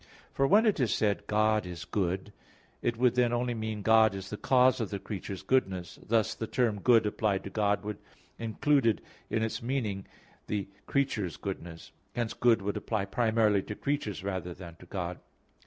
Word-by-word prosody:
For 135 Hz, -, +2 dB
when 215 Hz, +10 st, +5 dB
it 210 Hz, -7 st, +2 dB
is 125 Hz, -5 st, +2 dB
said, 105 Hz, -1 st, 0 dB
"God 110 Hz, -2 st, +2 dB
is 90 Hz, -1 st, -7 dB
good," 95 Hz, +1 st, -2 dB, 0.5 s
it 120 Hz, -1 st, 0 dB
would 125 Hz, 0 st, +4 dB
then 125 Hz, -1 st, +3 dB
only 120 Hz, 0 st, 0 dB
mean 110 Hz, -2 st, -4 dB
"God 110 Hz, -2 st, +5 dB
is 95 Hz, -1 st, -7 dB
the -, -, -2 dB
cause 130 Hz, +2 st, +4 dB
of 110 Hz, -, -2 dB
the 100 Hz, -, -3 dB
creature's 95 Hz, -1 st, -6 dB
goodness"; 95 Hz, -9 st, 0 dB
thus 110 Hz, -1 st, +1 dB
the 110 Hz, -, -5 dB
term 110 Hz, -5 st, 0 dB
good 115 Hz, -1 st, +5 dB
applied 105 Hz, -2 st, 0 dB
to 100 Hz, -, -7 dB
God 105 Hz, -1 st, +1 dB
would 105 Hz, -1 st, -5 dB, 0.4 s
included 115 Hz, +1 st, +2 dB, 0.3 s
in 110 Hz, -, 0 dB
its 110 Hz, -, -2 dB
meaning 115 Hz, -6 st, -2 dB, 0.4 s
the 105 Hz, -2 st, -2 dB, 0.2 s
creature's 110 Hz, -, 0 dB
goodness. 85 Hz, -4 st, -7 dB, 0.2 s
Hence 120 Hz, -2 st, -1 dB
"good" 115 Hz, -4 st, +3 dB
would 100 Hz, +1 st, -1 dB
apply 105 Hz, -4 st, -1 dB
primarily 110 Hz, -1 st, +2 dB
to 105 Hz, -, -6 dB
creatures 110 Hz, -9 st, -2 dB
rather 95 Hz, -3 st, -3 dB
than 85 Hz, -3 st, -10 dB
to 90 Hz, -, -15 dB
God. 90 Hz, -2 st, -4 dB
110 Hz, 180 wpm, -30 LUFS, 95-120 Hz, 0.5 s, when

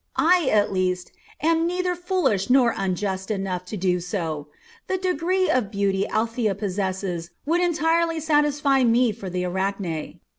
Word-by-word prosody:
I 340 Hz, -3 st, +4 dB
at 210 Hz, -1 st, +3 dB
least 180 Hz, -1 st, -1 dB, 0.3 s
am 330 Hz, +1 st, +3 dB
neither 360 Hz, +1 st, 0 dB
foolish 350 Hz, -, 0 dB
nor 250 Hz, -2 st, +5 dB
unjust 190 Hz, +1 st, -2 dB
enough 190 Hz, -3 st, -2 dB
to 210 Hz, +4 st, -6 dB
do 180 Hz, -1 st, +1 dB
so. 165 Hz, -5 st, -4 dB, 0.4 s
The 375 Hz, -, 0 dB
degree 370 Hz, +1 st, 0 dB
of 245 Hz, -6 st, +1 dB
beauty 200 Hz, -1 st, 0 dB
Althea 225 Hz, -1 st, 0 dB
possesses 190 Hz, -3 st, -3 dB, 0.2 s
would 335 Hz, +4 st, +2 dB
entirely 330 Hz, -1 st, +1 dB
satisfy 295 Hz, -3 st, +2 dB
me 235 Hz, 0 st, +4 dB
for 200 Hz, -3 st, -7 dB
the 180 Hz, 0 st, -2 dB
Arachne. 190 Hz, -3 st, -3 dB
215 Hz, 145 wpm, -24 LUFS, -, 0.4 s, nor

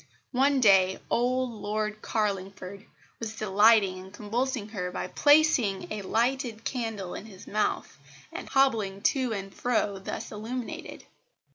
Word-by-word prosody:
One 275 Hz, +2 st, +3 dB
day 190 Hz, -4 st, +5 dB
old 250 Hz, +1 st, +1 dB
Lord 215 Hz, 0 st, -3 dB
Carlingford 195 Hz, -2 st, -3 dB, 0.3 s
was 220 Hz, -1 st, -5 dB
delighting 205 Hz, -2 st, +4 dB
and 190 Hz, +1 st, -11 dB
convulsing 220 Hz, +2 st, -2 dB
her 180 Hz, -4 st, -3 dB
by 180 Hz, -, -4 dB
placing 290 Hz, -10 st, +3 dB
a 210 Hz, -, -4 dB
lighted 235 Hz, +2 st, -1 dB
candle 225 Hz, -7 st, -3 dB
in 215 Hz, -, -7 dB
his 195 Hz, -3 st, -13 dB
mouth, 210 Hz, +1 st, -2 dB, 0.3 s
and -, -, -7 dB
hobbling 220 Hz, -8 st, +2 dB
to 260 Hz, -3 st, -1 dB
and 195 Hz, -2 st, -5 dB
fro 210 Hz, -5 st, 0 dB
thus 190 Hz, -, -6 dB
illuminated. 225 Hz, +3 st, -6 dB
215 Hz, 130 wpm, -28 LUFS, 195-245 Hz, 0.3 s, day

